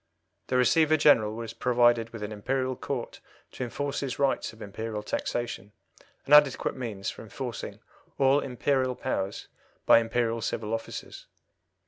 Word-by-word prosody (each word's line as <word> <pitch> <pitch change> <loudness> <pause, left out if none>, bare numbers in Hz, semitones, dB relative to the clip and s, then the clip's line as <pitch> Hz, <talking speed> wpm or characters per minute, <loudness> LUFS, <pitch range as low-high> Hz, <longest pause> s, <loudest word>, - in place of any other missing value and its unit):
The 125 - +1
Receiver 155 +5 +4
General 110 -8 +4
was 115 -1 -6
provided 120 -1 +3
with 115 -2 -8
an 105 - -4
Imperial 130 +5 -2
Court 125 -1 -5 0.3
to - - -5
enforce 140 +3 -3
his 135 -3 -3
rights 140 -1 0
of 110 - -17
Imperial 105 +1 -5
taxation, 105 -3 -3 0.5
and 145 - +1
adequate 145 -3 +5
means 110 -6 -4
for - - -11
enforcing - - -6 0.4
all 135 +1 +4
Imperial 130 0 0
powers 100 -7 -3 0.4
by - - +8
Imperial 115 0 -1
civil 110 0 -3
officers. 115 - -6
120 Hz, 140 wpm, -28 LUFS, 110-135 Hz, 0.5 s, by